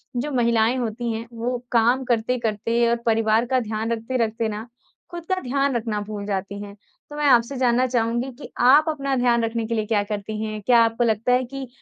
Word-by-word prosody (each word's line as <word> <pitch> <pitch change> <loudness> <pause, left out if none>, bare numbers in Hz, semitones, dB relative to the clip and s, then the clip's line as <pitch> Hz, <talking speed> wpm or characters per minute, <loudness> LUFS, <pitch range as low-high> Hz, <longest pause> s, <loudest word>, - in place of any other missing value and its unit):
जो 285 +5 -2
महिलाएँ 235 -1 +2
होती 235 0 -3
हैं, 225 +1 -5
वो 240 +2 -2
काम 240 +3 +3
करते-करते 235 -1 0
और 235 - +3
परिवार 225 0 +2
का 260 +1 +1
ध्यान 220 0 -3
रखते-रखते 230 -1 -1
ना, 215 +2 -5 0.5
खुद 345 -1 -7
का 375 - +2
ध्यान 275 +1 0
रखना 220 -2 -2
भूल 205 -1 -5
जाती 200 0 -4
हैं। 205 0 -9 0.3
तो 295 - -9
मैं 295 0 -1
आपसे 240 +1 +4
जानना 250 0 +2
चाहूँगी 240 +1 -1
कि - - -9
आप 280 +6 +6
अपना 275 -3 -1
ध्यान 240 -2 +2
रखने 225 0 -2
के 230 - -2
लिए 215 -1 -1
क्या 210 -2 +1
करती 210 +1 -5
हैं? 215 -1 -4
क्या 235 +3 +4
आपको 230 +1 0
लगता 225 +2 +1
है 255 +1 +3
कि 270 +1 -7
235 Hz, 205 wpm, -23 LUFS, 220-250 Hz, 0.5 s, आप